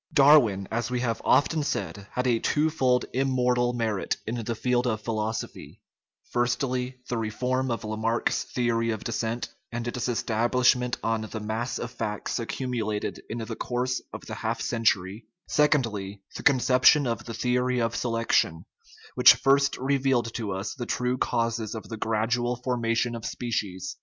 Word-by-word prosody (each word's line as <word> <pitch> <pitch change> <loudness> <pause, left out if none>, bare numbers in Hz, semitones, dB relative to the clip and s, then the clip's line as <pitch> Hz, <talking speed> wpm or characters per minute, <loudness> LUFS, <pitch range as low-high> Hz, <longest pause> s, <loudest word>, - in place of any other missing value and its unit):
Darwin, 130 -10 +6
as 120 +2 -1
we 125 0 -1
have 115 -2 -1
often 155 +2 +3
said, 100 - -3
had 125 - -1
a 120 -3 +2
twofold 145 -5 +2
im 135 +1 +1
mortal 125 -1 +2
merit 115 -5 -1
in 115 +1 -3
the 115 +1 -2
field 125 +2 +1
of 110 -2 -1
philosophy 110 0 -4 0.5
firstly, 125 +1 -1
the 120 - -2
reform 125 +4 -1
of 115 - -2
Lamarck's 110 +2 0
theory 115 -2 0
of 110 -1 -3
descent, 115 +1 -2 0.2
and 120 0 -4
its 120 +1 -2
estab 115 0 0
lishment 125 -1 +3
on 115 -1 0
the 110 0 -5
mass 110 +3 -3
of 120 - -5
facts 105 -1 -3
accumulated 115 -3 -3
in 115 - -4
the 115 -2 -5
course 125 +1 -2
of - - -7
the - - -7
half - - -2
century; 110 -2 0 0.2
secondly, 110 -10 +1
the - - -5
conception 130 +2 +5
of 115 -2 -2
the 115 - -6
theory 125 +1 +1
of 115 -1 0
selection, 115 -8 +1 0.5
which - - +8
first 140 0 +3
revealed 130 -3 +1
to 110 -4 -3
us 95 +2 -3
the 120 -3 -6
true 125 0 0
causes 115 -3 -1
of 110 - -7
the 115 - -4
gradual 115 +3 0
formation 120 -1 0
of 115 -1 -6
species. 100 -8 -3
120 Hz, 160 wpm, -26 LUFS, 110-125 Hz, 0.5 s, which